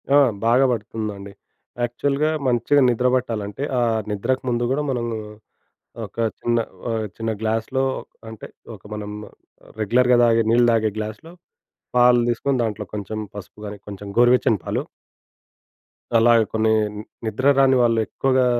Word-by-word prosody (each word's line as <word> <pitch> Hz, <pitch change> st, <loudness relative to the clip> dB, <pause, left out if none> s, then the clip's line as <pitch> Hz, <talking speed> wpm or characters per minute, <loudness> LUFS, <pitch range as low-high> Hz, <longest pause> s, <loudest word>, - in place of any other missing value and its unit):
ఆ! -, -, +8 dB, 0.3 s
బాగా 125 Hz, +4 st, +4 dB
పడుతుందండి. 105 Hz, -3 st, -5 dB, 0.5 s
యాక్చువల్‌గా 140 Hz, +5 st, 0 dB, 0.2 s
మంచిగా 130 Hz, +4 st, +3 dB
నిద్ర 125 Hz, +1 st, +1 dB
పట్టాలంటే, 115 Hz, -1 st, -3 dB, 0.2 s
ఆహ్, 115 Hz, -2 st, +1 dB
నిద్రకు 115 Hz, +6 st, -1 dB
ముందు 120 Hz, 0 st, 0 dB
కూడా 140 Hz, +3 st, +1 dB
మనము 120 Hz, -2 st, -2 dB, 0.9 s
ఒక -, -, -16 dB, 0.2 s
చిన్న 120 Hz, 0 st, 0 dB, 0.3 s
ఆహ్, 110 Hz, -1 st, -1 dB
చిన్న 115 Hz, 0 st, -2 dB
గ్లాస్‌లో 115 Hz, +4 st, -1 dB, 0.5 s
అంటే, 110 Hz, -1 st, -9 dB, 0.3 s
ఒక 95 Hz, -, -19 dB
మనం 105 Hz, -1 st, -6 dB, 0.7 s
రెగ్యులర్‌గా 125 Hz, +3 st, +3 dB
తాగే 115 Hz, -1 st, +4 dB
నీళ్ళు 120 Hz, +1 st, +4 dB
తాగే 110 Hz, -1 st, +1 dB
గ్లాస్‌లో, 110 Hz, +10 st, -6 dB, 0.6 s
పాలు 120 Hz, 0 st, +6 dB
తీసుకొని 130 Hz, +3 st, 0 dB
దాంట్లో 105 Hz, -2 st, -3 dB
కొంచెం 105 Hz, +1 st, -5 dB, 0.2 s
పసుపు 100 Hz, +1 st, -10 dB
కాని, 105 Hz, 0 st, -7 dB
కొంచెం 100 Hz, 0 st, -8 dB
గోరువెచ్చని 120 Hz, -3 st, +4 dB
పాలు. -, -, -2 dB, 1.3 s
అలాగా 115 Hz, 0 st, +5 dB
కొన్ని 110 Hz, 0 st, +2 dB, 0.3 s
ని 105 Hz, -, -6 dB, 0.2 s
నిద్ర 130 Hz, +6 st, +2 dB
రాని 135 Hz, -1 st, +5 dB
వాళ్ళు 115 Hz, -1 st, +3 dB
ఎక్కువగా 130 Hz, -1 st, +1 dB
115 Hz, 130 wpm, -22 LUFS, 110-125 Hz, 1.3 s, ఆ